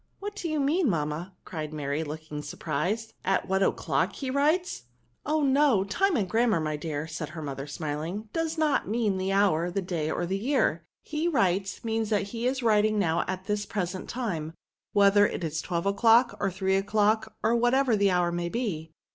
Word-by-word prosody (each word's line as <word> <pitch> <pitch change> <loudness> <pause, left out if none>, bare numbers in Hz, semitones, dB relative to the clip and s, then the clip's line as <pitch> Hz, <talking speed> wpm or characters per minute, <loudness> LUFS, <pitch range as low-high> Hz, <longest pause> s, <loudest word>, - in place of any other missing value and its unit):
" - - -43
What 410 +1 -5
do 350 -5 -4
you 310 -1 0
mean^ 310 +6 +2
mamma? 165 - -1
" - - -45
cried 155 -3 -5
Mary, 150 0 -2
looking 155 -1 -6
surprised^ 185 +10 -2
'^ - - -26
at 195 0 +1
what 190 +1 +1
o'clock - - +1
he 265 -2 -4
writes 310 +7 +1 0.4
r* 300 - 0
'^ - - +3
Oh! 305 - +1
no. 270 -6 +4
Time 350 - +1
in 205 - +1
grammar^ 225 -2 +2
my 155 -1 -1
dear," 150 -1 -4
said 160 -1 -5
her 160 +1 -7
mother, 140 -1 -5
smiling, 155 +6 -4
^^ - - -41
does 325 0 -1
not 310 -2 +1
mean 210 -3 0
the 190 +1 -1
hour, 190 -4 +2
the 180 - -2
day, 165 -4 -2
or 175 - -1
the 190 +3 -2
year. 275 +7 +1 0.2
He 310 +2 -2
writes, 195 - 0
means 225 -1 -1
that 205 -2 0
he 235 +3 -2
is 260 0 -1
writing 215 -1 +3
now 170 -4 +2
at 185 0 -4
this 210 -1 -2
present 185 -2 -3
time, 170 -11 -3 0.4
whether 205 0 +5
it - - -5
is 160 -1 -2
twelve 170 0 -2
o'clock, 225 +5 +4
or 200 - +1
three 190 +1 0
o'clock, 215 +2 +1
or 235 - +3
whatever. 245 +1 +3
the 200 -1 +3
hour 175 -1 +2
may 175 0 -2
be." 170 -9 -3
200 Hz, 210 wpm, -27 LUFS, 170-235 Hz, 0.4 s, whether